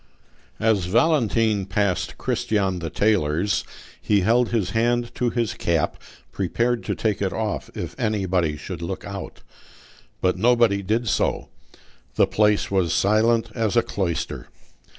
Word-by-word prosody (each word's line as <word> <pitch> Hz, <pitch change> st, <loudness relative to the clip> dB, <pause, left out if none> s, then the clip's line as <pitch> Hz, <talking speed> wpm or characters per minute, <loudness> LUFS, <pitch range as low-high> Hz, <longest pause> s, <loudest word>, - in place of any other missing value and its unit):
As 110 Hz, -5 st, +2 dB
Valentine 115 Hz, -, +2 dB
passed 100 Hz, -2 st, -1 dB
Christian 95 Hz, -4 st, -1 dB
the 85 Hz, -1 st, -4 dB
tailor's, 100 Hz, -2 st, +1 dB, 0.4 s
he 105 Hz, -2 st, +2 dB
held 115 Hz, +5 st, +3 dB
his 105 Hz, -6 st, -1 dB
hand 120 Hz, +2 st, 0 dB
to 125 Hz, -, 0 dB
his 115 Hz, -2 st, -1 dB
cap, 85 Hz, -3 st, 0 dB, 0.4 s
prepared 115 Hz, +6 st, -1 dB
to -, -, -1 dB
take 105 Hz, -3 st, -1 dB
it 95 Hz, -2 st, 0 dB
off 110 Hz, -2 st, -3 dB
if -, -, -5 dB
anybody 95 Hz, -7 st, 0 dB
should 85 Hz, +1 st, -7 dB
look 90 Hz, +3 st, -5 dB
out. 100 Hz, -1 st, -8 dB, 0.8 s
But 90 Hz, 0 st, 0 dB
nobody 115 Hz, -3 st, +3 dB
did 110 Hz, +5 st, -1 dB
so: -, -, 0 dB, 0.7 s
the -, -, +5 dB
place 105 Hz, -1 st, +1 dB
was 90 Hz, -4 st, +1 dB
silent 110 Hz, +3 st, +2 dB
as 115 Hz, -1 st, 0 dB
a 120 Hz, -, +5 dB
cloister. 90 Hz, -7 st, -3 dB
105 Hz, 135 wpm, -23 LUFS, 95-115 Hz, 0.8 s, the